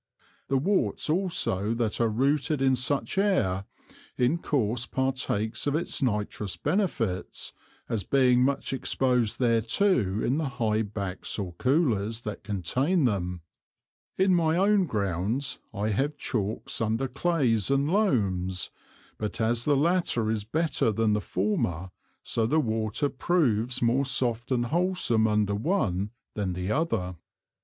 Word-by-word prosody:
The 135 - +1
Worts 185 0 +1
also 155 - 0
that 115 -1 -1
are 115 - +3
rooted 140 +6 +1
in 135 -1 +3
such 135 +8 -1
an - - +4
Air, 100 - +1 0.5
in 125 +7 +2
course 125 -5 0
partakes 130 -4 -1
of 145 - +1
its 165 0 -2
nitrous 105 -4 -1
Benefits, 140 - -2 0.3
as 110 -4 -2
being 125 +1 +3
much 140 0 0
exposed 125 -4 +1
thereto 115 - +2
in 135 +6 +1
the 155 -4 -1
high 110 -3 +1
Backs 100 -3 -3
or 95 -4 -4
Coolers 115 - +1
that 105 -3 -6
contain 130 - 0
them. 90 -6 -1 0.8
In 190 0 +3
my 165 -2 +2
own 195 -1 +3
Grounds 105 - -1
I 105 +2 -2
have 140 +8 -1
Chalks 110 -2 -2
under 115 +4 0
Clays 130 - +1
and 140 +1 +2
Loams; 100 - +1 0.5
but 105 -2 -3
as 115 +1 +1
the 145 -2 +3
latter 150 -8 +1
is 105 -2 -2
better 155 -2 +1
than 110 0 +1
the 105 - 0
former, 95 - -1 0.3
so 115 -1 0
the 155 +6 +2
Water 110 0 0
proves 130 -6 0
more 125 +4 +2
soft 125 -2 0
and 120 -2 +1
wholsome 165 -8 +2
under 105 -1 +1
one 105 - 0 0.2
than 100 -3 -2
the 90 +3 -3
other. 110 - -1
120 Hz, 140 wpm, -27 LUFS, 105-145 Hz, 0.8 s, an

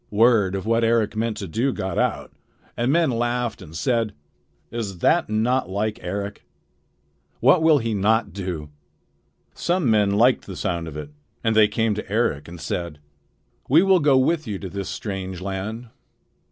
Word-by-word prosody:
Word 105 -3 +3
of 95 - -4
what 115 +1 +2
Eric 115 -2 +2
meant 110 0 -1
to 100 - -5
do 115 +10 0
got 95 -5 -3
out, - - -1 0.4
and 120 +3 +1
men 165 -2 +3
laughed 120 0 -1
and 80 - -11
said: 115 +1 0 0.6
"Is 110 -5 -4
that 165 - +2
not 115 +1 +1
like 105 +3 -2
Eric? 100 +3 -5 1.0
What 140 +8 +5
will 160 -2 +5
he 115 -4 -1
not 110 +3 +1
do?" 90 -7 -5 0.8
Some 175 -8 0
men 105 -2 +3
liked 115 +6 +3
the 95 - -7
sound 85 -4 -2
of 75 -2 -7
it, 75 -1 -7 0.3
and 110 -1 +1
they 110 -1 +6
came 110 +1 0
to 105 -1 -6
Eric 105 -10 0
and 85 0 -10
said: 85 -1 -4 0.7
"We 155 +7 +6
will 190 -1 +5
go 145 -3 +4
with 155 +3 +1
you 105 -2 -3
to 95 0 -7
this 100 -1 -4
strange 95 -3 -5
land." 100 +5 -5
110 Hz, 170 wpm, -23 LUFS, 95-120 Hz, 1.0 s, they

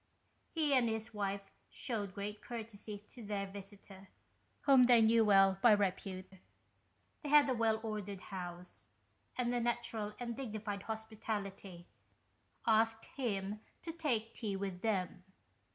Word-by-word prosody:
He 310 -4 +1
and 250 -3 +4
his 220 0 -3
wife 200 -1 -3 0.2
shewed 205 -6 -3
great 205 +1 -5
courtesy 220 -3 -6
to 240 - -10
their 205 -1 -2
visitor, 195 0 -11 0.5
whom 270 -3 +7
they 240 -1 +7
knew 225 0 +5
well 195 -2 +5
by 235 -3 +8
repute. 190 -1 -1 0.8
They 295 - -5
had 295 -1 +7
a 260 - +2
well 225 -2 +2
ordered 205 -3 -4
house, 180 -2 -8 0.5
and 245 -1 +1
with 245 - +1
a - - 0
natural 220 -3 -2
and 235 -1 -3
dignified 215 -5 -4
hospitality, 205 -4 -5 0.8
asked 225 0 +3
him 210 -5 -2 0.2
to 330 - -3
take 250 -9 -1
tea 210 -4 -3
with 190 -2 -4
them. 185 -4 -1
215 Hz, 135 wpm, -35 LUFS, 195-230 Hz, 0.8 s, by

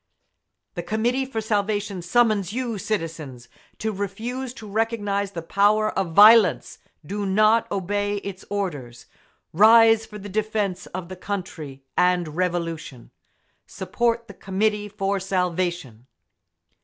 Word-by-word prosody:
The 175 - -4
Committee 230 +8 -1
for 225 -4 -3
Salvation 205 -2 -1
summons 205 +1 +2
you, 240 -4 -3
citizens, 160 - -4 0.3
to 220 - -2
refuse 225 +6 -4
to 220 -4 -10
recognise 205 -2 -1
the 170 - -5
power 210 +4 +2
of 185 -4 -2
violence. 205 - +6 0.3
Do 205 +5 -4
not 215 +3 +3
obey 205 +2 -1
its 200 -1 -6
orders! 145 -13 -4 0.5
Rise 225 +3 +6
for 210 -1 -10
the 205 0 -9
defence 205 -3 -2
of 180 -1 -6
the 185 - -8
country 175 -8 -6
and 180 -2 +2
Revolution! 165 -6 -4 0.6
Support 235 0 -2
the 200 - -10
Committee 210 +2 -1
for 200 -1 -2
Salvation! 180 - -2
200 Hz, 120 wpm, -23 LUFS, 180-215 Hz, 0.6 s, violence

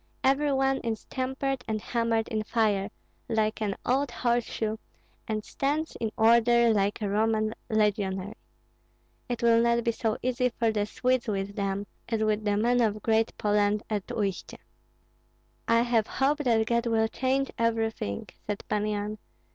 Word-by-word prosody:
Every 280 +2 +3
one 270 0 +2
is 225 -2 -4
tempered 265 0 -2
and 220 -1 -1
hammered 230 0 0
in 215 -1 -1
fire, 215 -3 +1 0.4
like 220 -1 0
an 205 -2 -1
old 270 +2 +1
horseshoe, 235 -2 -1 0.5
and 215 -1 -2
stands 300 +3 -2
in 220 -2 -2
order 235 +1 +5
like 205 +1 0
a - - 0
Roman 215 +1 +1 0.2
legionary. 205 -2 0 1.0
It 240 0 -3
will 230 0 +5
not 235 0 +2
be 235 - +2
so 225 0 -1
easy 250 0 +1
for 230 -2 +2
the 210 -1 -1
Swedes 255 +2 0
with 200 -1 -2
them, 200 0 -2 0.2
as 225 -2 0
with 215 0 +1
the 205 -1 +2
men 240 +3 +3
of 215 -2 0
Great 225 0 +1
Poland 210 0 +1
at 205 -3 -2
Uistsie." 195 -4 -3 1.1
"I 230 0 +4
have 235 -3 +1
hope 285 +3 +1
that 230 -6 +2
God 235 +1 +1
will 225 -1 +2
change 265 +3 0
everything," 225 - -1 0.2
said 205 -1 -3
Pan 210 0 0
Yan. 210 0 -2
225 Hz, 155 wpm, -28 LUFS, 210-240 Hz, 1.1 s, order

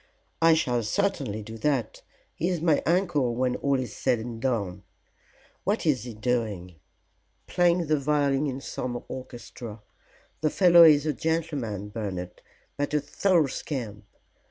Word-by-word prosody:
"I 165 0 +6
shall 125 -6 +1
certainly 110 - -1
do 110 +2 -9
that. 130 -4 -1 0.3
He 175 - -1
is 180 -2 -1
my 160 -2 +2
uncle 165 -9 +1
when 125 0 0
all 140 -1 +1
is 125 -5 -5
said 120 - +1
and 115 0 -7
done. 100 -8 -1 0.8
What 205 0 0
is 130 -7 +1
he 120 -3 -7
doing?" 105 -7 -2 0.7
"Playing 175 -1 +2
the 155 -1 +1
violin 145 0 +1
in 135 0 -4
some 120 -2 -4
orchestra. 120 -3 -8 0.6
The 155 - +1
fellow 175 0 +7
is 150 -2 +6
a 155 - +1
gentleman, 145 - -2
Bernard, 95 -5 -5 0.4
but 145 +1 -1
a - - +4
thorough 165 +3 +2
scamp. 115 -7 -5
135 Hz, 145 wpm, -26 LUFS, 115-155 Hz, 0.8 s, fellow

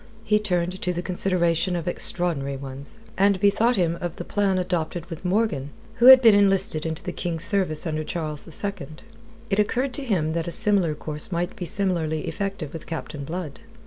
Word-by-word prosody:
He 210 -1 +2
turned 180 -3 -1
to 180 - -1
the 175 +1 -4
consideration 180 -1 0
of 170 0 -4
extraordinary 160 -6 -1
ones, 135 +5 -7 0.2
and 200 -1 +4
bethought 215 +5 +3
him 170 -3 0
of 175 -2 -4
the - - -6
plan 195 0 0
adopted 175 -2 -2
with 165 - -7
Morgan, 180 -8 0 0.3
who 240 +1 +5
had 260 0 +10
been 225 -2 +8
enlisted 195 -5 +3
into 160 -1 -4
the 180 - -4
King's 170 -3 -2
service 185 -6 +2
under 155 -1 -2
Charles 155 -2 -5 0.2
II. 195 -8 -4 0.6
It 195 - +2
occurred 250 +5 0
to 285 - -2
him 170 -11 0
that 165 0 -2
a - - -3
similar 200 -7 +1
course 150 +3 -4
might 175 +1 -2
be 180 - -5
similarly 170 -5 +1
effective 195 -7 -4
with 165 - -8
Captain 155 -3 -6
Blood. 160 -1 -6
175 Hz, 185 wpm, -24 LUFS, 160-200 Hz, 0.6 s, had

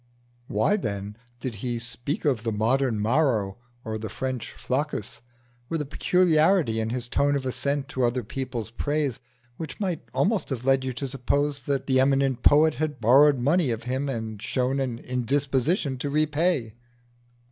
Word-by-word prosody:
Why, 110 - +2
then, 100 - -4 0.2
did 125 -1 -4
he 120 -2 -2
speak 120 +6 -3
of 130 -7 +2
the 115 0 -2
modern 115 +2 +1
Maro 110 -4 +1 0.3
or 110 0 -3
the 110 - -6
modern 130 -1 -1
Flaccus 140 +6 -3 0.5
with 165 - -1
a 150 - -2
peculiarity 160 - +3
in 110 0 -1
his 120 0 -3
tone 145 +3 +2
of 135 -2 -2
assent 140 +2 -1
to 130 - -1
other 120 +1 +1
people's 120 -1 -5
praise 145 -1 -1 0.4
which 160 -3 -7
might 185 -6 -1
almost 205 +1 +1
have 125 -3 -4
led 135 0 +3
you 130 - -2
to 135 +3 -4
suppose 140 +1 -1
that 140 -2 -1
the 130 -1 +3
eminent 135 -1 +2
poet 155 +1 +5
had 150 +1 -3
borrowed 135 +5 +6
money 145 +5 +2
of 115 0 -2
him 130 +3 -2
and 110 -4 -4
showed 130 +3 0
an 130 -4 -2
indisposition 135 - 0
to 145 - -2
repay? 150 -4 +1
130 Hz, 165 wpm, -26 LUFS, 120-145 Hz, 0.5 s, borrowed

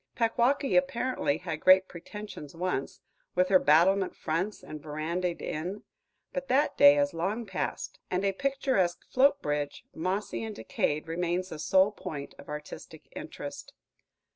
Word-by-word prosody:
Packwaukee 245 +4 +2
apparently 255 - +1
had 165 -3 -5
great 185 +2 +6
pretensions 180 -4 -9
once, 170 -6 -3 0.3
with 180 0 +3
her 190 -1 +6
battlement 180 +6 +4
fronts 185 +7 -2
and 155 -1 -8
verandaed 165 +4 -3
inn; 180 +7 -4 0.5
but 270 0 -3
that 270 +4 +2
day 285 0 +8
has 285 0 +1
long 200 +8 -2
passed, 190 -3 -4
and 185 +2 0
a 195 - +3
picturesque 260 -6 0
float 280 +2 +4
bridge, 145 -1 -2
mossy 185 +5 -2
and 220 -1 -5
decayed, 150 +7 -1
remains 175 +2 -1
the 160 - -7
sole 190 +6 +4
point 160 -9 -7
of - - -12
artistic 150 0 -8
interest. - - -7
185 Hz, 140 wpm, -29 LUFS, 160-225 Hz, 0.5 s, day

